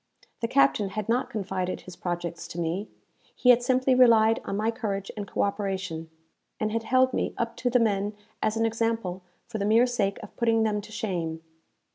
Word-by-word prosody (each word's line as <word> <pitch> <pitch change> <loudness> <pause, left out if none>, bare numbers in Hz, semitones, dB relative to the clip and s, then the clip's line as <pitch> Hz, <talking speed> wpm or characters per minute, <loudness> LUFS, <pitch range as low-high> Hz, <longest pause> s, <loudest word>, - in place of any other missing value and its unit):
The 230 - -1
captain 235 -5 +3
had 215 +1 -4
not 240 +3 +1
confided 190 -3 -3
his 185 - -11
projects 175 -1 -4
to 175 - -7
me; 170 +5 -2 0.5
he 250 - +6
had 245 0 +5
simply 255 +1 +2
relied 225 -3 +5
on 195 - -2
my 220 +2 +1
courage 200 -4 -3
and 205 -2 -5
co - - 0
operation, 190 -5 -3 0.5
and 215 0 0
had 230 +1 0
held 255 +3 +3
me - - -1
up 230 0 -2
to 250 - 0
the 250 - +4
men 205 -3 +1 0.3
as 215 +1 0
an 225 - +2
example 225 -5 -1 0.2
for 220 - -5
the - - -1
mere 225 +4 +5
sake 210 -6 0
of - - -11
putting 225 -2 +3
them 210 -1 0
to 215 - -13
shame. 170 -7 -3
215 Hz, 195 wpm, -27 LUFS, 195-230 Hz, 0.5 s, he